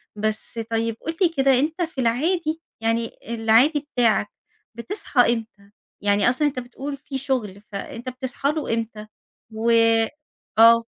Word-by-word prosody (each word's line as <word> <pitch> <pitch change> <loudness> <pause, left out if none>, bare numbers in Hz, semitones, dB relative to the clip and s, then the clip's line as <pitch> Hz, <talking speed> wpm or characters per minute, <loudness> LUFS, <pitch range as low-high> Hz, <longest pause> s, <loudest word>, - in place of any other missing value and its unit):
بس 215 +2 -3
طيّب 225 0 0
قُل 325 0 -4
لي 350 - +5
كده 270 -5 +3
أنت 320 +5 -1
في 320 -6 -2
العادي 315 +7 0 0.2
يعني 230 +1 0 0.2
العادي 235 +7 +3
بتاعك 225 -4 +3 0.5
بتصحى 245 - +1
إمتى؟ 215 -3 -8 0.3
يعني 205 +2 +3
أصلًا 295 +4 +2
أنت 265 -3 -2
بتقول 270 +3 -6
في 270 0 -6
شغل 240 -8 -2
فأنت 230 +5 -6
بتصحى 260 +2 -2
له 300 -7 -2
إمتى؟ 220 -2 -4 0.4
و 225 +2 -1 0.9
آه. 230 0 +8
245 Hz, 135 wpm, -23 LUFS, 225-285 Hz, 0.9 s, آه